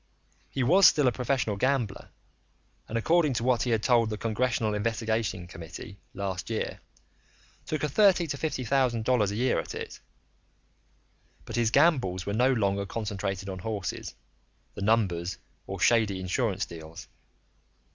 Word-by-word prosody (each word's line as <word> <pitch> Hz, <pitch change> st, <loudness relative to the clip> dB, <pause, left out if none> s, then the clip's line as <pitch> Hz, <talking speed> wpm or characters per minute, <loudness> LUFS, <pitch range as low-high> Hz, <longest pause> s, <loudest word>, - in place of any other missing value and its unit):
He 135 Hz, -, -1 dB
was 180 Hz, +9 st, +7 dB
still 145 Hz, -3 st, +4 dB
a -, -, +4 dB
professional 125 Hz, -4 st, -1 dB
gambler, 130 Hz, -4 st, -1 dB, 0.8 s
and 115 Hz, -, -2 dB
according 160 Hz, +4 st, +3 dB
to 115 Hz, -, -2 dB
what 125 Hz, -1 st, +2 dB
he 130 Hz, -, 0 dB
had 110 Hz, -3 st, +1 dB
told 120 Hz, -3 st, +3 dB
the 105 Hz, -, -3 dB
Congressional 115 Hz, -1 st, 0 dB
Investigating 110 Hz, -3 st, -1 dB
Committee 85 Hz, +4 st, -10 dB, 0.2 s
last 95 Hz, 0 st, -4 dB
year, 110 Hz, -, -3 dB, 0.9 s
took 155 Hz, -1 st, -2 dB
in 150 Hz, -, +1 dB
thirty 190 Hz, 0 st, +4 dB
to 145 Hz, -, -3 dB
fifty 140 Hz, -3 st, -2 dB
thousand 125 Hz, -3 st, +1 dB
dollars 120 Hz, -6 st, +3 dB
a 100 Hz, -, -4 dB
year 125 Hz, +3 st, +1 dB
at -, -, -6 dB
it, -, -, -7 dB, 1.5 s
but -, -, -6 dB
his 120 Hz, -2 st, +2 dB
gambles 125 Hz, -, +2 dB
were 100 Hz, -, -2 dB
no 125 Hz, +5 st, +3 dB
longer 100 Hz, -4 st, 0 dB
concentrated 100 Hz, -3 st, -3 dB
on 95 Hz, -1 st, -5 dB
horses, 100 Hz, -1 st, -4 dB, 0.6 s
the -, -, -8 dB
numbers, 95 Hz, -5 st, +1 dB, 0.3 s
or -, -, -5 dB
shady 110 Hz, -5 st, +3 dB
insurance 95 Hz, +2 st, -1 dB
deals. 80 Hz, 0 st, -10 dB
115 Hz, 150 wpm, -28 LUFS, 100-130 Hz, 1.5 s, was